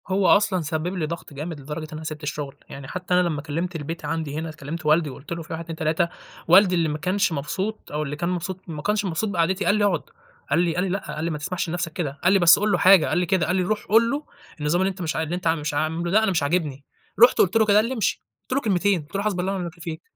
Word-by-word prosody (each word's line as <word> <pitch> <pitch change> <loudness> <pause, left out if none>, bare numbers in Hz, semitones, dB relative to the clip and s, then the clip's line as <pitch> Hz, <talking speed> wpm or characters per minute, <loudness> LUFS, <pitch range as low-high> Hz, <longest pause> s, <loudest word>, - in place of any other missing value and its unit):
هو 190 +1 +2
أصلًا 200 -3 +4
سبب 155 +1 -2
لي 170 -4 -1
ضغط 165 -1 -7
جامد 150 +2 -6
لدرجة 150 +3 -6
إن - - -7
أنا 155 +1 -6
سِبت 155 0 -6
الشغل، 145 -2 -4
يعني 135 -1 -9
حتى 180 +2 -4
أنا 180 - +5
لمّا 150 -4 -2
كلمت 165 +5 -3
البيت 160 +1 -5
عندي 150 -1 -3
هنا، 160 0 -5
كلمت 155 +2 -7
والدي 155 0 +3
وقُلت 135 +3 -11
له 170 0 -3
في 160 - -8
1 165 +1 -4
2 165 -1 -7
3، 160 +1 0 0.4
والدي 185 +2 +6
اللي 165 -2 +1
ما 150 - -2
كانش 185 +4 0
مبسوط 190 +9 -4
أو 150 +1 -1
اللي 145 0 -4
كان 170 +3 -2
مبسوط 180 +1 -3
ما 155 -2 -5
كانش 210 +3 0
مبسوط 190 +4 -1
بقعدتي 185 +1 0
قال 205 - +4
لي: 210 -1 +2
"اقعد." 175 -7 +1 0.5
قال 145 +4 +3
لي 170 -2 +1
قال 180 - +1
لي: 195 - -1
"لأ"، 195 +2 -4
قال 155 - -4
لي: 170 - -1
"ما 155 - -3
تسمحش 170 +3 -3
لنفسك 175 -1 -3
كده." 145 -5 -4
قال 180 +2 +5
لي: 195 - +5
"بس 175 0 +7
قُل 210 +1 +1
له - - +3
حاجة" 185 -4 +6
قال - - 0
لي 180 - +2
كده، 175 -1 +1
قال 180 - +1
لي: 185 - +2
"روح 210 +3 -2
قُل 230 +2 +5
له 290 +2 -2 0.4
النظام 150 +4 +1
اللي 190 - +2
أنت 190 -1 -7
مش 160 -3 -2
ع - - 0
اللي 160 +2 -3
أنت 180 -1 -3
مش 150 -2 0
عاملة 160 +3 -1
ده 215 +3 +4
أنا 220 - +2
مش 160 -5 +1
عاجبني"، 145 -3 -1 0.4
رُحت 245 - +7
قُلت 200 +4 +3
له 220 - +4
كده 205 -1 +3
قال 215 - +4
لي: 250 - -2
"امشي." 225 -6 -1 0.2
قُلت - - -5
له 275 - +1
كلمتين، 200 - +1
قُلت 150 +6 -14
له: 200 - 0
"حسبي 200 -4 0
الله 190 +2 -1
ونعم 190 - -3
الوكيل 170 -1 -7
فيك"، 160 -2 -5
170 Hz, 290 wpm, -24 LUFS, 155-190 Hz, 0.5 s, بس